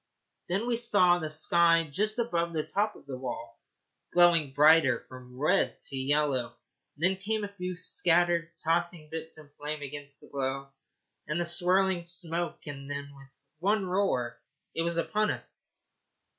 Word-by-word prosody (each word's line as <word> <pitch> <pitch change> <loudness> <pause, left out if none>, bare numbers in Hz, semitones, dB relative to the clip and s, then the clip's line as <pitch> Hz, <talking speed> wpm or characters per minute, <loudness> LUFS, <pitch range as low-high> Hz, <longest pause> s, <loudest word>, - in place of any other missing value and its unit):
Then 195 +6 0
we 240 -1 +1
saw 195 -7 +4
the 155 -2 -4
sky 165 +2 +3
just 210 +10 -1
above 170 -8 -1
the 155 -1 -1
top 205 +8 -1
of - - -16
the 135 -2 -6
wall 130 - -6 0.5
glowing 170 -5 +5
brighter 145 -3 +5
from 125 -1 -12
red 165 +8 +1
to - - -6
yellow; 135 -3 0 0.4
then 185 +5 +2
came 215 +2 -1
a - - -2
few 180 -2 -4
scattered, 175 -1 +2
tossing 165 -1 -1
bits 160 0 -7
of 145 -2 -15
flame 150 0 -4
against 145 0 -7
the - - -15
glow 135 0 -3 0.6
and 150 +3 -1
the 175 - 0
swirling 180 +2 +3
smoke; 170 0 -3
and 140 -2 -7
then, 140 0 -5
with 135 0 -18
one 200 +3 +1
roar, 180 -12 -1 0.3
it - - -1
was 170 0 0
upon 215 +5 +1
us. - - -6
165 Hz, 155 wpm, -29 LUFS, 145-180 Hz, 0.6 s, glowing